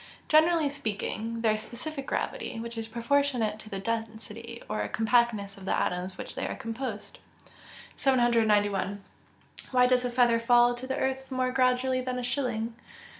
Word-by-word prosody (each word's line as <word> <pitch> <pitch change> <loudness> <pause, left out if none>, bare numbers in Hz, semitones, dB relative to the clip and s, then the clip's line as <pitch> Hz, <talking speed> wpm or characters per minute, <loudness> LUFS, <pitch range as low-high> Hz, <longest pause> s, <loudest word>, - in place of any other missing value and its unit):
_ - - -31
Generally 315 -1 +4
speaking, 225 -2 -3
their 215 -2 +2
specific 275 +5 -6
gravity, 450 - -3
which 235 +1 -6
is 225 -1 -4
proportionate 235 -2 +1
to 215 - -11
the 195 - -4
density, 230 +2 -5
or 215 - -2
compactness 225 -3 +1
of 190 - -11
the - - +1
atoms 180 +1 -1
of - - -19
which - - -6
they - - -3
are - - -4
composed. 230 -2 -5 0.8
791. 210 -6 +2 0.7
_Why 250 -1 +4
does 250 0 +3
a 250 - 0
feather 240 -1 +3
fall 240 +1 +5
to 245 +2 -7
the 265 +1 -2
earth 265 -1 -2
more 255 -1 0
gradually 255 0 +2
than 255 0 -3
a 250 - -3
shilling? 240 -3 -1
235 Hz, 165 wpm, -28 LUFS, 220-255 Hz, 0.8 s, fall